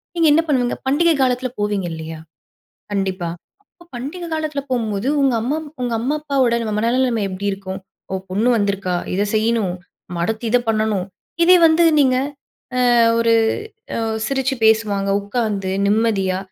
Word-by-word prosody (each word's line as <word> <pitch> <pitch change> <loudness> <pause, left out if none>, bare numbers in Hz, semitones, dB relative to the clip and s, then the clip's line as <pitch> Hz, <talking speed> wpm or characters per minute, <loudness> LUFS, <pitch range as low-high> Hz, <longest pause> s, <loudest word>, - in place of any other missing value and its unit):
நீங்க 335 -2 +3
என்ன 320 - +5
பண்ணுவீங்க? 255 -5 +1
பண்டிகை 325 +4 +3
காலத்தில 255 0 +1
போவீங்க 205 -2 -1
இல்லையா? 160 0 -7 0.7
கண்டிப்பா. 190 -3 -1 0.5
அப்ப - - -19
பண்டிகை 305 +9 -6
காலத்தில 310 -2 -2
போகும்போது 225 -2 -1
உங்க 270 -3 +3
அம்மா 265 +6 -1 0.3
உங்க 240 -2 -1
அம்மா 270 +6 0
அப்பாவோட 265 -5 +1
நம்ம 215 -2 -2
மனநிலைமை 235 -1 +1
எப்படி 190 +2 -5
இருக்கும்? 190 -1 -6 0.3
ஓ! - - -2 0.2
பொண்ணு 210 +6 +1
வந்திருக்கா. 200 -3 -1 0.2
இதை 200 +2 +1
செய்யணும். 215 -4 +1 0.3
நம்ம 175 -1 -5
அடுத்து 220 +4 -3
இதை 245 - +4
பண்ணணும். 215 -4 0 0.4
இதே 365 +2 +7
வந்து 325 +1 +4 0.2
நீங்க 260 -2 +3 0.6
அ - - +2 0.4
ஒரு, 230 0 +3 0.6
அ - - -1 0.3
சிரிச்சு 265 0 0
பேசுவாங்க 210 -3 +2
உட்காந்து, 205 -2 -2 0.2
நிம்மதியா. 205 -3 +1
225 Hz, 145 wpm, -20 LUFS, 200-260 Hz, 0.7 s, இதே